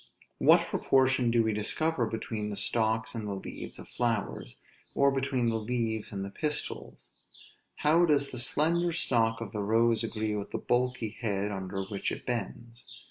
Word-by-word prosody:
What - - +6
proportion 130 -2 +3
do 115 0 +3
we 110 -1 +1
discover 120 +5 0
between 110 -1 -4
the 105 - -4
stalks 110 +2 +1
and 110 -3 -4
the 100 - -3
leaves 95 - -8
of - - -10
flowers, 115 -4 -2 0.4
or 140 0 +4
between 135 -3 0
the 115 -1 0
leaves 110 -1 -2
and 100 -1 -4
the 100 - -7
pistils? 150 +4 -4 0.6
How 165 +4 +4
does 145 -3 +2
the 125 - -4
slender 170 +7 +2
stalk 115 -8 +1
of 110 -4 -5
the 105 - -3
rose 115 +2 +3
agree 110 -1 -2
with 100 -1 -4
the - - -3
bulky 125 -2 0
head 105 -3 -1
under 95 0 -4
which 100 +1 -3
it - - -6
bends? 120 0 -5
115 Hz, 170 wpm, -29 LUFS, 105-130 Hz, 0.6 s, What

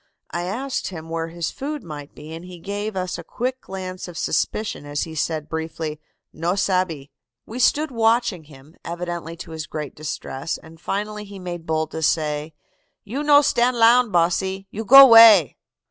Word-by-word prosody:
"I 175 +1 -3
asked 255 +9 -3
him 165 -3 -8
where 165 0 -3
his 165 0 -4
food 290 +1 -5
might 150 -4 -9
be, 155 +2 -10
and 165 +1 -8
he 180 0 -10
gave 205 +4 -5
us 185 -1 -3
a - - -8
quick 255 +2 -4
glance 185 -1 -7
of 175 -1 -9
suspicion 215 -8 -2
as 145 0 -3
he 160 - -7
said 155 0 -2
briefly, 160 -1 -5 0.3
'No 170 +4 -1
sabbe.' 185 -8 -1 0.4
"We 235 +3 -7
stood 300 +4 +2
watching 225 -6 +1
him, 145 +2 -17
evidently 170 -1 -5
to 165 - -9
his 160 -1 -6
great 150 -2 -6
distress, 150 -1 -5
and 160 +1 -16
finally 210 +2 -3
he 200 -1 -10
made 175 -3 -7
bold 160 0 -1
to 160 - -5
say, 150 0 -1 0.5
'You 245 +8 -4
no 295 -1 +6
stand 245 -2 +2
lound, 235 0 +5
bosse. 170 0 +2 0.3
You 220 - -5
go 275 +5 +11
'way. 225 - +8
175 Hz, 175 wpm, -22 LUFS, 160-220 Hz, 0.5 s, go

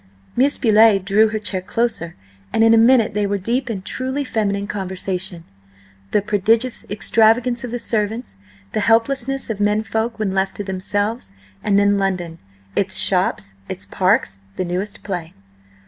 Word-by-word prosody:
Miss 275 +4 +3
Betty 220 -3 +5
drew 200 +3 +3
her 215 0 -2
chair 195 -3 -2
closer, 205 -3 -2 0.4
and 225 - +2
in 225 0 +6
a - - +6
minute 230 -2 +4
they 205 0 0
were 200 0 0
deep 235 +7 -2
in 195 -5 -4
truly 260 +7 -3
feminine 200 -5 -1
conversation: 190 -3 -4 0.7
the 205 - +1
prodigious 220 +4 +1
extravagance 230 +4 +2
of 245 - -4
the 245 - -3
servants; 220 - -2 0.3
the - - -1
helplessness 235 +4 +1
of 210 - -5
men 210 +1 +1
folk 225 +1 -2
when 210 -3 -1
left 190 0 0
to 205 - -4
themselves, 205 - -3 0.3
and 200 -1 +2
then 200 0 +3
London, 180 -4 -2 0.4
its 195 -1 +1
shops, 180 - +2 0.2
its - - -5
parks, 95 0 +1 0.2
the 185 - -2
newest 185 +4 -4
play. 175 -4 -5
210 Hz, 160 wpm, -20 LUFS, 190-230 Hz, 0.7 s, in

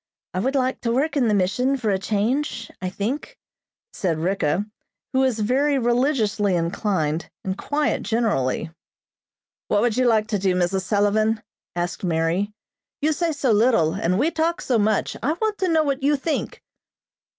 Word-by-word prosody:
I 185 - -1
would 265 +8 0
like 260 -1 0
to 230 - 0
work 280 +7 +1
in 260 -5 +3
the 210 - +3
mission 250 +9 +1
for 225 -5 0
a 190 - +1
change, 230 +5 -1
I 185 - -2
think," 255 - -4 0.6
said 175 -6 -1
Ricka, 180 +1 0 0.5
who 260 - +2
was 260 -4 +2
very 270 +7 +2
religiously 235 -5 +1
inclined 170 -2 -1
and 190 0 -2
quiet 290 +7 -1
generally. 205 - 0 1.0
"What 205 - +2
would 235 -2 +1
you 255 -1 +3
like 220 -2 +3
to 210 -2 0
do, 185 -1 +1
Mrs. 180 +1 +1
Sullivan?" 215 +3 +1 0.3
asked 175 +2 -3
Mary. 170 +4 0 0.5
"You 310 +1 +3
say 335 +2 0
so 290 -5 0
little, 210 -8 +3
and 180 +2 0
we 295 +9 +2
talk 330 +2 0
so 245 -4 +1
much. 215 0 +1
I 280 +7 +1
want 425 +4 -2
to 375 - +1
know 320 -1 +3
what 280 -2 -1
you 290 +2 +3
think." 295 +3 -3
220 Hz, 170 wpm, -23 LUFS, 190-270 Hz, 1.0 s, in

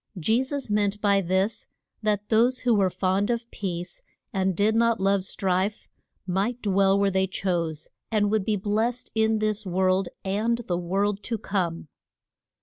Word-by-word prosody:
Je 220 +9 +2
sus 275 +1 -3
meant 205 -1 0
by 200 -1 +3
this 190 +4 0 0.3
that 210 -1 -1
those 240 +3 +3
who 245 -2 +3
were 195 -3 +3
fond 190 +3 0
of 235 -1 -1
peace, 175 -2 -4 0.3
and 190 -1 +1
did 210 +2 +3
not 230 -1 +2
love 195 0 +2
strife, 190 +1 -1 0.4
might 195 +6 -1
dwell 195 -2 +3
where 200 0 +2
they 190 0 +1
chose, 170 -5 -2 0.2
and 205 -2 +1
would 215 -2 +2
be 215 +1 0
blest 220 +5 -1
in 220 0 +2
this 215 0 -1
world 185 0 +1 0.2
and 220 +5 0
the 175 - -1
world 195 +3 0
to 230 +1 -3
come. 175 -6 -2
200 Hz, 160 wpm, -26 LUFS, 190-220 Hz, 0.4 s, by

